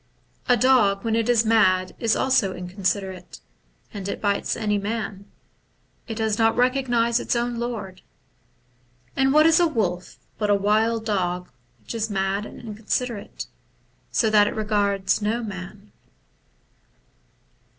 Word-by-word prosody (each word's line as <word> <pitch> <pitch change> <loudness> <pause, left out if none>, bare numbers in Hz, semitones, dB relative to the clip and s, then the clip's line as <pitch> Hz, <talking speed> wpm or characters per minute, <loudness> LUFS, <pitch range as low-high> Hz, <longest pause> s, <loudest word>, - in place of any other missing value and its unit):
A 245 - +5
dog 210 -5 +3
when 225 -1 +1
it 230 +1 0
is 235 -2 +4
mad 185 -5 +3
is 225 -2 +2
also 255 -8 +2
inconsiderate, 185 0 -4 0.5
and 200 -1 -5
it - - -4
bites 200 -1 0
any 210 -2 0
man; 205 -1 -4 0.8
it 225 - -4
does 220 -1 -1
not 225 0 +3
recognize 245 -2 +2
its - - -1
own 240 0 -1
lord: 215 -6 -5 1.1
and 270 0 +3
what 305 +2 +5
is 325 +1 +5
a 345 - +4
wolf 185 - -2 0.2
but 210 -1 0
a 205 - +5
wild 220 +3 +1
dog 180 - -2 0.3
which - - -8
is 225 -1 -2
mad 195 +1 -1
and - - -12
inconsiderate, 220 0 -4 0.6
so 225 - +1
that 205 -1 +5
it - - -3
regards 205 -2 0
no 225 +3 -1
man. 200 0 -8
215 Hz, 140 wpm, -23 LUFS, 195-230 Hz, 1.1 s, A